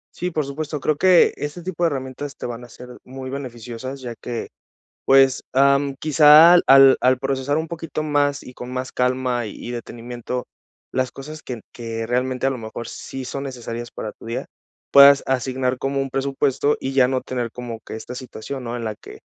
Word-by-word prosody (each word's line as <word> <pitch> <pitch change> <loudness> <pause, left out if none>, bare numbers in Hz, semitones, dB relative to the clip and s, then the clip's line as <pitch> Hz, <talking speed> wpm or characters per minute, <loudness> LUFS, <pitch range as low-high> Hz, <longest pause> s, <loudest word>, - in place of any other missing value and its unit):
Sí, 180 - -2
por 155 -4 -2
supuesto. 150 +1 -5
Creo 150 +1 +1
que 180 +1 +5
este 150 +4 -5
tipo 175 -1 -3
de - - +5
herramientas 135 -1 -5
te - - -7
van 120 0 -6
a - - -16
ser 125 +1 -12
muy 130 0 -8
beneficiosas, 130 0 -7
ya 120 -2 -5
que, 120 0 -6 0.6
pues, 135 -1 +4
am, 140 +1 +3
quizá 155 +2 +8
al 135 0 +8
al 130 0 +3
procesar 135 +1 -1
un 160 +1 -3
poquito 165 -1 -5
más 145 -2 +1
y 125 - -11
con 125 0 -8
más 130 0 -4
calma, 125 -1 0
y 105 +3 -8
detenimiento, 120 +1 -6 0.4
las 130 -1 -1
cosas 150 +3 -9
que 120 -3 -6
que 115 -1 -5
realmente 125 +1 -1
a - - +2
lo 130 - -4
mejor 115 +1 -7
sí 135 -1 -7
son 135 +2 -5
necesarias 120 -3 -6
para 110 - -5
tu - - -15
día, 115 +2 -4 0.4
puedas 140 0 +8
asignar 130 0 -1
como 135 +1 -1
un 135 - -5
presupuesto, 140 +1 0
y 135 - -3
ya 135 -2 +5
no 130 0 0
tener 120 -3 -4
como 120 -2 -6
que - - -7
esta 110 +3 -7
situación, 130 +1 -7
¿no?, 120 0 -4
en 120 - -5
la 110 -1 -4
que, - - -13
130 Hz, 195 wpm, -22 LUFS, 125-140 Hz, 0.6 s, quizá